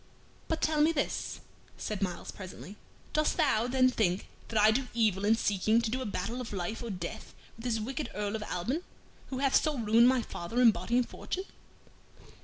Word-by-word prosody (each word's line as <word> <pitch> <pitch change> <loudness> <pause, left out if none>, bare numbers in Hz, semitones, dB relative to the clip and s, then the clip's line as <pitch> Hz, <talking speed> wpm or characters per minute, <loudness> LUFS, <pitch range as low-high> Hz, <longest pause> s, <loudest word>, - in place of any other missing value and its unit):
"But 325 - -2
tell 310 -1 +2
me 310 +2 +5
this," 310 - -2 0.4
said 210 -2 -4
Myles, 180 -3 -3
presently, 190 +1 -9 0.4
"dost 305 0 +2
thou, 220 +2 +3
then, 255 0 +4
think 190 -5 0 0.2
that 225 - 0
I 215 +1 +7
do 250 +3 0
evil 210 -4 +2
in 220 +2 +5
seeking 215 +1 +2
to 225 -2 -1
do 260 +2 -1
a 255 - -3
battle 225 +6 -3
of 245 - -6
life 190 +3 -3
or 235 - -5
death 185 +2 -6 0.2
with 225 - -11
this 230 -2 0
wicked 260 +5 -3
Earl 205 +1 -2
of 220 - -3
Alban, 210 - -2 0.5
who 260 - -4
hath 275 0 +4
so 305 -3 -1
ruined 230 +1 +5
my 255 -2 +3
father 175 +7 -4
in 240 -2 +8
body 205 +6 -1
and 250 - +2
fortune?" 375 - -4
225 Hz, 200 wpm, -30 LUFS, 205-255 Hz, 0.5 s, in